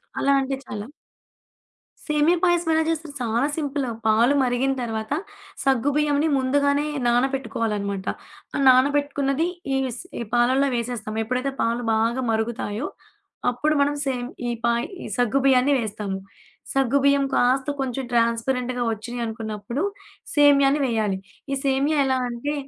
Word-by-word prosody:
చాలా 280 - +1
అంటె 270 0 -2
చాలా. 210 +1 -6 1.2
సేమియా 300 +3 +3
పాయసం 345 -2 +2
ఎలా 320 0 +3
జేస్తారు 320 -2 -2
చాలా 235 +3 +1
సింపులు. 285 -4 -2 0.2
పాలు 230 +5 +4
మరిగిన 255 +2 +1
తర్వాత 220 +1 -3 0.5
సగ్గు 270 0 +2
బియ్యంని 300 0 +2
ముందుగానే 285 +2 +2 0.2
నానపెట్టుకోవాలనమాట. 225 -6 -1 0.5
ఆ - - 0
నానబెట్టుకున్నది 280 +3 +2 0.3
ఈవిస్ 265 -3 -2 0.2
ఈ - - -1
పాలల్లొ 260 +3 +3
వేసేస్తాం. 230 -2 -3
ఎప్పుడైతే 255 +4 -1
పాలు 235 +1 0
బాగా 230 +4 +1
మరుగుతాయో, 220 +2 -2 0.6
అప్పుడు 300 +6 0
మనం 290 +1 +2
సేమ్ 250 -2 -2 0.2
ఈ - - 0
పాయ్ 235 0 +1 0.2
ఈ - - -6
సగ్గు 245 +3 +2
బియ్యాన్ని 265 +1 +4
వేస్తాము. 210 -3 -3 0.6
సగ్గు 270 0 +2
బియ్యం 280 0 +4
కాస్త 260 +3 +2
కొంచెం 265 0 -2
ట్రాన్స్‌పరెంట్‌గా 240 +2 0
వచ్చినయనుకున్నప్పుడు 225 - -4 0.5
సేమ్యాని 285 -1 +5
వేయాలి. 215 -5 0 0.3
ఈ - - +1
సేమ్యా 275 +3 +2
ఎలా 260 -1 +1
అంటే 240 +5 -3
255 Hz, 125 wpm, -23 LUFS, 230-280 Hz, 1.2 s, సేమ్యాని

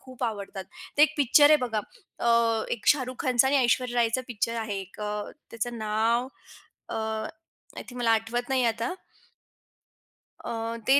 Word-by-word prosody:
खूप 255 -1 -6
आवडतात. 200 -3 -4 0.3
ते 295 - +6
एक 310 0 +4
पिक्चर 290 +2 +6
आहे 305 - +8
बघा 220 -2 -1 0.5
अ, 230 -1 +3
एक 215 - -4
शाहरुख 255 -3 +3
खानचा 255 0 +3
आणि 285 - +3
ऐश्वर्या 245 0 +1
रायचं 235 +2 +1
पिक्चर 230 0 -2
आहे 205 -3 -3
एक 195 +2 -12
अ, 210 0 -2 0.3
त्याचं 230 +1 -4
नाव 225 +4 +1 0.6
अ, - - -5
आय 220 0 -6
थिंक 250 -1 -9
मला 230 -1 +2
आठवत 225 +3 -1
नाहीये 255 -2 +2
आता. 230 - -2 1.5
अ, - - -3 0.4
ते 275 +2 +6
235 Hz, 160 wpm, -27 LUFS, 220-255 Hz, 1.5 s, आहे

